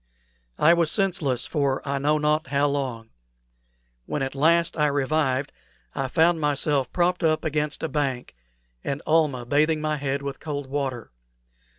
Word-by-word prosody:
I 165 Hz, +3 st, +5 dB
was 170 Hz, -2 st, +2 dB
senseless 165 Hz, -, 0 dB
for 140 Hz, -3 st, -1 dB
I 140 Hz, 0 st, -1 dB
know 150 Hz, +2 st, +2 dB
not 150 Hz, +1 st, +1 dB
how 140 Hz, 0 st, +1 dB
long. 130 Hz, -6 st, -3 dB, 1.0 s
When 145 Hz, -, -2 dB
at 135 Hz, -, -3 dB
last 165 Hz, +4 st, +2 dB
I 150 Hz, -2 st, +2 dB
revived 140 Hz, -1 st, 0 dB, 0.4 s
I 135 Hz, -, -2 dB
found 160 Hz, +4 st, +2 dB
myself 145 Hz, -2 st, 0 dB
propped 180 Hz, 0 st, +1 dB
up 155 Hz, -1 st, +1 dB
against 150 Hz, 0 st, -1 dB
a -, -, +1 dB
bank, 135 Hz, -4 st, -2 dB, 0.5 s
and 140 Hz, +1 st, -3 dB
Almah 150 Hz, -6 st, +2 dB
bathing 155 Hz, +5 st, +2 dB
my 155 Hz, 0 st, -1 dB
head 140 Hz, 0 st, -2 dB
with 140 Hz, -1 st, -5 dB
cold 145 Hz, -2 st, -4 dB
water. 130 Hz, -, -4 dB
145 Hz, 155 wpm, -24 LUFS, 135-155 Hz, 1.0 s, I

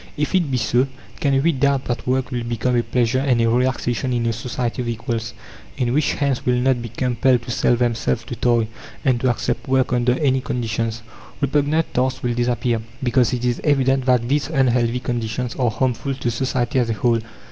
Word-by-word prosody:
If 150 Hz, +4 st, -1 dB
it 175 Hz, -6 st, +2 dB
be 130 Hz, -, 0 dB
so, 120 Hz, +3 st, +2 dB, 0.3 s
can 135 Hz, -1 st, +2 dB
we 170 Hz, -, +4 dB
doubt 140 Hz, -1 st, +1 dB
that 120 Hz, -1 st, -3 dB
work 130 Hz, 0 st, 0 dB
will 120 Hz, -1 st, -2 dB
become 120 Hz, +1 st, -1 dB
a 120 Hz, -, +3 dB
pleasure 120 Hz, +2 st, +1 dB
and 130 Hz, -3 st, +2 dB
a 115 Hz, -, +3 dB
relaxation 125 Hz, +1 st, 0 dB
in 120 Hz, -1 st, 0 dB
a 115 Hz, -, +1 dB
society 120 Hz, +2 st, -3 dB
of 120 Hz, -, -4 dB
equals, 115 Hz, -1 st, -3 dB, 0.4 s
in 125 Hz, -2 st, 0 dB
which 150 Hz, +2 st, +2 dB
"hands" 140 Hz, -3 st, -1 dB
will 125 Hz, -, +2 dB
not 125 Hz, 0 st, +2 dB
be 115 Hz, -, -6 dB
compelled 125 Hz, +1 st, +1 dB
to 120 Hz, -, -6 dB
sell 120 Hz, -, +2 dB
themselves 115 Hz, -, 0 dB
to -, -, -6 dB
toil, 120 Hz, -2 st, +2 dB, 0.4 s
and 130 Hz, -3 st, +3 dB
to 130 Hz, -, +2 dB
accept 120 Hz, +2 st, -2 dB
work 130 Hz, -1 st, +2 dB
under 125 Hz, +1 st, +2 dB
any 135 Hz, -4 st, +2 dB
conditions? 115 Hz, -2 st, -2 dB, 0.4 s
Repugnant 145 Hz, +3 st, +1 dB
tasks 130 Hz, +1 st, 0 dB
will 120 Hz, -1 st, 0 dB
disappear, 120 Hz, -1 st, 0 dB, 0.2 s
because 125 Hz, -1 st, +2 dB
it 125 Hz, -1 st, -2 dB
is 120 Hz, -1 st, 0 dB
evident 135 Hz, -3 st, +2 dB
that 125 Hz, -2 st, +3 dB
these 145 Hz, +2 st, +1 dB
unhealthy 125 Hz, -5 st, +1 dB
conditions 120 Hz, 0 st, -2 dB
are 125 Hz, -3 st, +2 dB
harmful 130 Hz, +4 st, -1 dB
to 120 Hz, -2 st, -2 dB
society 130 Hz, +2 st, 0 dB
as 120 Hz, -2 st, +1 dB
a -, -, +1 dB
whole. 115 Hz, +2 st, +1 dB
125 Hz, 200 wpm, -21 LUFS, 120-130 Hz, 0.4 s, we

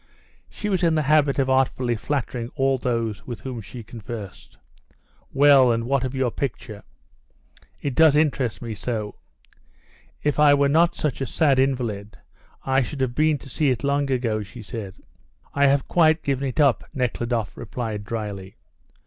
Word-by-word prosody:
She 210 Hz, -, -6 dB
was 190 Hz, -3 st, 0 dB
in 165 Hz, -2 st, +3 dB
the 155 Hz, -, +1 dB
habit 145 Hz, -1 st, +3 dB
of 135 Hz, -2 st, +1 dB
artfully 130 Hz, -2 st, +1 dB
flattering 120 Hz, 0 st, -3 dB
all 135 Hz, -2 st, +1 dB
those 115 Hz, -5 st, -2 dB
with 120 Hz, -5 st, -6 dB
whom 125 Hz, -1 st, -6 dB
she 115 Hz, +3 st, -10 dB
conversed. 110 Hz, -3 st, -9 dB, 0.7 s
"Well, 135 Hz, -3 st, +6 dB
and 115 Hz, 0 st, 0 dB
what 135 Hz, +2 st, 0 dB
of 130 Hz, 0 st, -3 dB
your 130 Hz, -2 st, 0 dB
picture? 115 Hz, -5 st, -5 dB, 1.0 s
It 140 Hz, -, -3 dB
does 160 Hz, +1 st, +5 dB
interest 135 Hz, -, 0 dB
me 115 Hz, -2 st, -4 dB
so. 105 Hz, 0 st, -4 dB, 1.1 s
If 150 Hz, 0 st, 0 dB
I 145 Hz, -1 st, +6 dB
were 140 Hz, 0 st, +2 dB
not 170 Hz, +3 st, +3 dB
such 145 Hz, -3 st, -2 dB
a 135 Hz, -, -1 dB
sad 140 Hz, -2 st, +2 dB
invalid 115 Hz, -6 st, -1 dB, 0.5 s
I 135 Hz, 0 st, +2 dB
should 135 Hz, +2 st, -4 dB
have 130 Hz, -2 st, 0 dB
been 155 Hz, +2 st, +2 dB
to 140 Hz, -, -14 dB
see 145 Hz, +2 st, 0 dB
it 125 Hz, -3 st, -1 dB
long 140 Hz, 0 st, 0 dB
ago," 120 Hz, -5 st, 0 dB
she 105 Hz, +3 st, -10 dB
said. 100 Hz, -3 st, -7 dB, 0.6 s
"I 140 Hz, 0 st, +4 dB
have 140 Hz, 0 st, +2 dB
quite 160 Hz, -2 st, +3 dB
given 140 Hz, 0 st, -1 dB
it 130 Hz, -, -4 dB
up," 140 Hz, -5 st, +3 dB
Nekhludoff 120 Hz, -3 st, -2 dB
replied 110 Hz, -4 st, -5 dB
drily. 105 Hz, -3 st, -6 dB
130 Hz, 165 wpm, -23 LUFS, 115-140 Hz, 1.1 s, Well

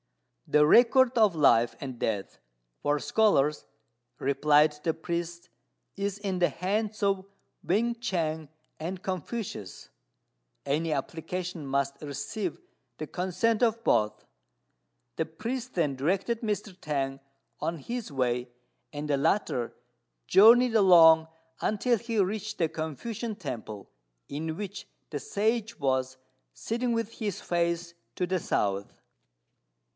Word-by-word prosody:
"The 150 Hz, 0 st, +5 dB
record 245 Hz, -, +5 dB
of 215 Hz, -5 st, +5 dB
life 120 Hz, -6 st, +4 dB
and 130 Hz, -3 st, -6 dB
death 105 Hz, -3 st, -2 dB, 0.4 s
for 145 Hz, 0 st, +1 dB
scholars," 150 Hz, -8 st, +2 dB, 0.5 s
replied 150 Hz, +2 st, +3 dB
the 165 Hz, -, +1 dB
priest, 170 Hz, +1 st, -4 dB, 0.5 s
"is 200 Hz, 0 st, -2 dB
in 195 Hz, -3 st, -3 dB
the 175 Hz, -, +4 dB
hands 210 Hz, +4 st, -2 dB
of 195 Hz, -1 st, +2 dB, 0.4 s
Wên 235 Hz, +6 st, +1 dB
ch'ang 160 Hz, -7 st, -2 dB, 0.3 s
and 180 Hz, +4 st, -5 dB
Confucius; 185 Hz, -, -5 dB, 0.8 s
any 155 Hz, +4 st, 0 dB
application 165 Hz, +3 st, -4 dB
must 140 Hz, 0 st, -1 dB
receive 150 Hz, -, -4 dB, 0.4 s
the 155 Hz, -, -5 dB
consent 190 Hz, +7 st, 0 dB
of 230 Hz, -1 st, +2 dB
both." 105 Hz, -, +1 dB, 0.9 s
The 160 Hz, -, -1 dB
priest 235 Hz, +10 st, -5 dB
then 150 Hz, -6 st, +1 dB
directed 190 Hz, -, 0 dB
Mr. 210 Hz, -3 st, -3 dB
T'ang 135 Hz, -4 st, -3 dB, 0.4 s
on 170 Hz, -, -1 dB
his 235 Hz, -, -5 dB
way, 125 Hz, -2 st, -1 dB, 0.4 s
and 150 Hz, 0 st, -5 dB
the 145 Hz, -1 st, +1 dB
latter 135 Hz, -, 0 dB, 0.5 s
journeyed 230 Hz, +3 st, +7 dB
along 165 Hz, -5 st, +7 dB, 0.3 s
until 235 Hz, +3 st, +1 dB
he 230 Hz, 0 st, -2 dB
reached 205 Hz, +2 st, -1 dB
a 165 Hz, -, +3 dB
Confucian 200 Hz, -, -5 dB
temple, 110 Hz, -, -7 dB, 0.4 s
in 160 Hz, +3 st, -4 dB
which 205 Hz, -1 st, -6 dB, 0.3 s
the 145 Hz, -, -3 dB
Sage 220 Hz, -, -1 dB
was 130 Hz, -2 st, 0 dB, 0.4 s
sitting 240 Hz, +2 st, -2 dB
with 230 Hz, -2 st, -1 dB
his 205 Hz, -5 st, -2 dB
face 170 Hz, 0 st, -1 dB, 0.2 s
to 180 Hz, -, 0 dB
the 185 Hz, 0 st, 0 dB
south. 100 Hz, -8 st, -1 dB
175 Hz, 120 wpm, -28 LUFS, 145-210 Hz, 0.9 s, journeyed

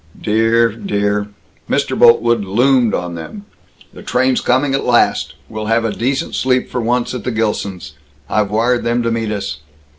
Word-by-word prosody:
"Dear 115 Hz, +2 st, +2 dB
dear 105 Hz, -, -1 dB, 0.2 s
" -, -, -35 dB
Mr. -, -, 0 dB
Boltwood 115 Hz, -1 st, +4 dB
loomed 120 Hz, +4 st, +2 dB
on 90 Hz, 0 st, -4 dB
them. 200 Hz, -, -8 dB, 0.5 s
"The -, -, -11 dB
train's 130 Hz, +1 st, +1 dB
coming, 135 Hz, +2 st, +1 dB
at 135 Hz, -, 0 dB
last. 120 Hz, -1 st, +2 dB
We'll 110 Hz, -1 st, -6 dB
have 115 Hz, +1 st, +1 dB
a 110 Hz, -, -1 dB
decent 130 Hz, +5 st, -2 dB
sleep 130 Hz, -1 st, 0 dB
for 125 Hz, -, -2 dB
once, 120 Hz, +2 st, 0 dB
at 125 Hz, -4 st, -5 dB
the -, -, -2 dB
Gilsons'. 105 Hz, -7 st, -3 dB, 0.3 s
I've 105 Hz, -2 st, 0 dB
wired 120 Hz, +4 st, +1 dB
them 120 Hz, +1 st, 0 dB
to 115 Hz, -, 0 dB
meet 115 Hz, -1 st, -2 dB
us." 100 Hz, -9 st, -4 dB
115 Hz, 175 wpm, -17 LUFS, 105-125 Hz, 0.5 s, Boltwood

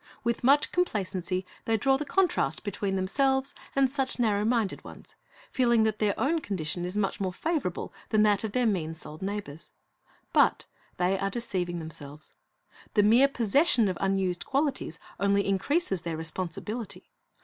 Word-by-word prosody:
With 235 Hz, 0 st, -1 dB
much 280 Hz, +4 st, +4 dB
complacency 190 Hz, -, -1 dB, 0.2 s
they 225 Hz, 0 st, +2 dB
draw 270 Hz, +5 st, +3 dB
the 300 Hz, +3 st, -3 dB
contrast 380 Hz, +3 st, +1 dB
between 200 Hz, -1 st, -2 dB
themselves 265 Hz, +8 st, +1 dB, 0.2 s
and 275 Hz, -1 st, +4 dB
such 265 Hz, 0 st, -1 dB
narrow 210 Hz, -4 st, +2 dB
minded 225 Hz, -3 st, 0 dB
ones, -, -, -12 dB, 0.4 s
feeling 235 Hz, -3 st, +3 dB
that 220 Hz, -1 st, 0 dB
their 210 Hz, -2 st, +1 dB
own 320 Hz, +4 st, +1 dB
condition 175 Hz, -, -3 dB
is 180 Hz, +3 st, -4 dB
much 200 Hz, -2 st, 0 dB
more 190 Hz, -1 st, 0 dB
favorable 290 Hz, -, -2 dB, 0.2 s
than 215 Hz, -1 st, +4 dB
that 205 Hz, -1 st, +3 dB
of 220 Hz, -, -2 dB
their 250 Hz, -1 st, +2 dB
mean 165 Hz, -7 st, 0 dB
souled 155 Hz, -1 st, -9 dB
neighbors. 190 Hz, -6 st, -5 dB, 0.6 s
But -, -, +3 dB, 0.3 s
they 185 Hz, +2 st, +1 dB
are 195 Hz, -, 0 dB
deceiving 185 Hz, -6 st, -3 dB
themselves. 155 Hz, -2 st, -8 dB, 0.6 s
The 210 Hz, -, +5 dB
mere 235 Hz, +6 st, +6 dB
possession 245 Hz, -, +3 dB
of 185 Hz, -2 st, -2 dB
unused 195 Hz, -2 st, 0 dB
qualities 275 Hz, -, -1 dB, 0.2 s
only 200 Hz, 0 st, +2 dB
increases 195 Hz, -, 0 dB
their 165 Hz, -1 st, -4 dB
responsibility. 185 Hz, +7 st, -5 dB
205 Hz, 155 wpm, -28 LUFS, 185-250 Hz, 0.6 s, mere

